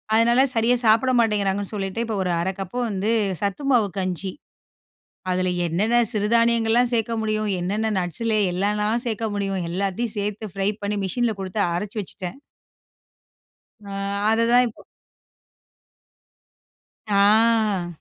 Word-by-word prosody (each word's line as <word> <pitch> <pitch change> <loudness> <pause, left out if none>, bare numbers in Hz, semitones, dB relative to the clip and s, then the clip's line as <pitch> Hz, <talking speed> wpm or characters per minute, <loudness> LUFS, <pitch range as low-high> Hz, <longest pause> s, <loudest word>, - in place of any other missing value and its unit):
அதனா 235 +3 +4
சரியா 230 +2 +3
சாப்பிட 225 +4 +4
மாட்டேங்கிறாங்கன்னு 205 -3 0
சொல்லிட்டு, 195 +3 -3
இப்போ 225 -1 -3
ஒரு 180 - -1
1/2 185 +3 0
கப்பு 195 +5 -5
வந்து 200 +1 -2 0.3
சத்து 200 +6 -2
மாவு 230 -5 +4
கஞ்சி. 185 0 -3 1.0
அதில 185 0 0 0.2
என்னென்ன 195 +8 0 0.2
சிறுதானியங்கள்லாம் 230 +2 +2
சேர்க்க 230 0 0
முடியும்? 215 -1 -1
என்னென்ன 210 +5 -1
நட்ஸ் 175 +4 -4
லே 215 - +2
எல்லான்னா 210 +3 0 0.2
சேர்க்க 225 -1 -2
முடியும்? 195 -2 -2
எல்லாத்தையும் 200 +6 -2
சேர்த்து 210 0 -4
ஃப்ரை 195 0 0
பண்ணி 205 +1 -2
மிஷின்ல 235 +5 0
குடுத்து 190 +2 -3
அரைச்சு 205 +5 -4
வச்சுட்டேன். 185 0 -7 1.5
ஆ, - - -9 0.4
அதுதான் 230 +2 +4
இப்போ, 225 - -11 2.3
ஆ. 210 -1 +4
210 Hz, 120 wpm, -23 LUFS, 195-225 Hz, 2.3 s, அதனா